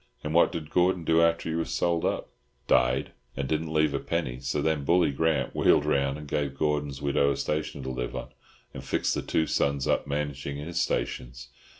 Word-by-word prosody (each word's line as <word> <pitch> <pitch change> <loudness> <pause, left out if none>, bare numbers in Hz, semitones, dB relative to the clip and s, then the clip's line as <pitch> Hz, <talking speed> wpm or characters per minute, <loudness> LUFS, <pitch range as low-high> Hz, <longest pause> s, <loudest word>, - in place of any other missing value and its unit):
"And 75 - -3
what 85 - +5
did 80 -2 -6
Gordon 90 -1 +2
do 80 +1 +3
after 85 0 +2
he 80 - -1
was 80 0 -2
sold 85 -1 0
up?" - - -1 0.4
"Died, 65 +1 +2 0.3
and 70 -1 -2
didn't 80 +2 -1
leave 75 -2 +2
a 70 - 0
penny. 75 -7 -2
So 70 +3 -2
then 75 -1 0
Bully 85 +1 +3
Grant 75 -2 0
wheeled - - +4
round 70 0 +1
and 75 -1 -9
gave 70 -1 -2
Gordon's 75 -3 -1
widow 70 0 +2
a - - -6
station 75 -2 -2
to 65 - -4
live 60 -1 -4
on, - - -5 0.4
and - - -7
fixed - - 0
the - - -1
two 80 - 0
sons 70 -2 0
up - - +1
managing 70 -1 -3
his 85 +4 -4
stations. 65 -2 -3
75 Hz, 205 wpm, -27 LUFS, 70-80 Hz, 0.4 s, what